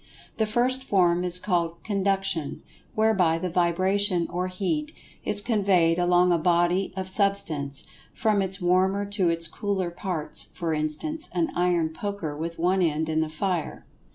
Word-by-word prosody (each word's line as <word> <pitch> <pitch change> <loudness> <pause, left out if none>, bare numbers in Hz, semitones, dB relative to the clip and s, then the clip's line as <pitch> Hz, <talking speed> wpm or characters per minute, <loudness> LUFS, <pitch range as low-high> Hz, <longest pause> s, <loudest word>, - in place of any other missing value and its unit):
The 220 - +1
first 250 +4 0
form 180 -6 +2
is 180 0 +4
called 170 -3 -1
"Conduction," 195 -6 -1 0.3
whereby 200 -7 +2
the 180 +1 -4
vibration, 185 +1 +2
or 180 +1 -2
Heat, 180 -5 -3 0.3
is 205 - +5
conveyed 190 -7 +2
along 180 0 +3
a 170 - +2
body 175 +3 +1
of 190 -1 -3
Substance, 185 -8 0 0.3
from 215 -3 +1
its 190 0 -1
warmer 190 +3 +1
to 200 -3 0
its 165 0 +2
cooler 190 0 -3
parts—for 170 -1 -2
instance, 155 - -2
an 170 -2 0
iron 175 -2 +1
poker 165 -2 -5
with 165 +2 -5
one 185 +3 +1
end 160 -2 0
in 160 0 +1
the 160 - -2
fire. 170 +1 -3
180 Hz, 150 wpm, -25 LUFS, 165-200 Hz, 0.3 s, is